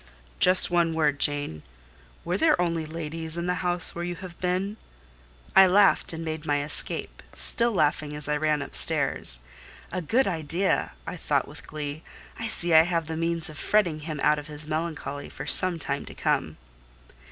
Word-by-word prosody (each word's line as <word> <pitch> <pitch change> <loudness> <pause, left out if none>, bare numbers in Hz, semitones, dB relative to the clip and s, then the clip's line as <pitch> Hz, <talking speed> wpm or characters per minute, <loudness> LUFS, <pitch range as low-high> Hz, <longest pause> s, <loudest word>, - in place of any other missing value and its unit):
"Just 185 -1 +5
one 170 -2 +1
word, 150 -3 +1
Jane: 145 - 0 0.6
were 175 +2 -1
there 305 - +2
only 165 -2 -1
ladies 160 0 -5
in 170 - -3
the 180 - 0
house 175 -1 +2
where 170 - -5
you 175 0 -4
have 180 0 -11
been?" 185 +3 -2 0.8
I 190 0 +8
laughed 195 +2 +3
and 165 0 -6
made 155 -1 -5
my 145 -2 -1
escape, 145 - -1
still 235 0 +4
laughing 150 -5 0
as 150 -1 -7
I 150 - 0
ran 150 -1 0
upstairs. - - +1 0.5
"A 185 - -3
good 230 - +1
idea!" 170 +2 -1
I - - -6
thought - - -1
with - - -12
glee. 150 0 -6 0.4
"I 225 - -3
see 175 -6 +3
I 160 - +9
have 165 -1 -1
the 160 +1 -5
means 165 +1 +1
of 155 -2 -7
fretting 180 -8 +1
him 155 -1 -6
out 150 0 +3
of 145 - -10
his 150 0 -4
melancholy 155 -2 -4
for - - -8
some 185 -2 +5
time 140 -3 -4
to - - -12
come." - - -1
165 Hz, 180 wpm, -25 LUFS, 150-180 Hz, 0.8 s, I